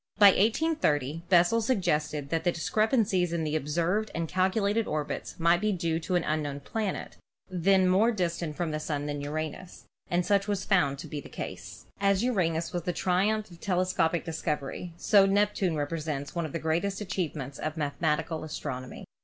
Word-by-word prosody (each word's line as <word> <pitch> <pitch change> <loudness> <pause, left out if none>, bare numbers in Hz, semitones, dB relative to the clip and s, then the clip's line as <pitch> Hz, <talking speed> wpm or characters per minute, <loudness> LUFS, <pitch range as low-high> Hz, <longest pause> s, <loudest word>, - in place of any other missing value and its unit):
About 200 -2 +8
1830 185 - +1
Bessel 180 +5 +5
suggested 150 - 0
that 165 -1 0
the 175 - +3
discrepancies 190 - +1
in 170 -1 -1
the 155 0 -1
observed 170 +8 0
and 165 0 -1
calculated 200 +5 +1
orbits 150 +3 -4
might 170 +2 +4
be 215 0 +2
due 165 -4 -1
to 170 +2 -2
an 175 - +2
unknown 145 -2 -2
planet, 210 +6 -4 0.3
then 185 +1 +3
more 200 +6 +4
distant 170 -6 -2
from 170 -1 -2
the 155 - -2
Sun 145 -2 -3
than 145 -1 -3
Uranus, 155 +4 -5 0.2
and 175 0 +1
such 200 -1 +2
was 200 -2 -1
found 145 -9 +2
to - - -8
be 150 -2 -5
the 95 -8 -6 0.4
As 200 +1 +2
Uranus 170 -9 0
was 175 - -1
the 180 +1 -2
triumph 200 +4 +1
of 170 - -13
telescopic 180 -3 +1
discovery, 160 0 -3
so 195 +1 +5
Neptune 200 -3 +2
represents 150 -1 -3
one 170 -2 -2
of - - -10
the - - -2
greatest 170 +5 -1
achievements 165 -9 -4
of 155 +1 -3
mathematical 155 +2 -1
astronomy. 130 -4 -6
170 Hz, 170 wpm, -28 LUFS, 155-195 Hz, 0.4 s, About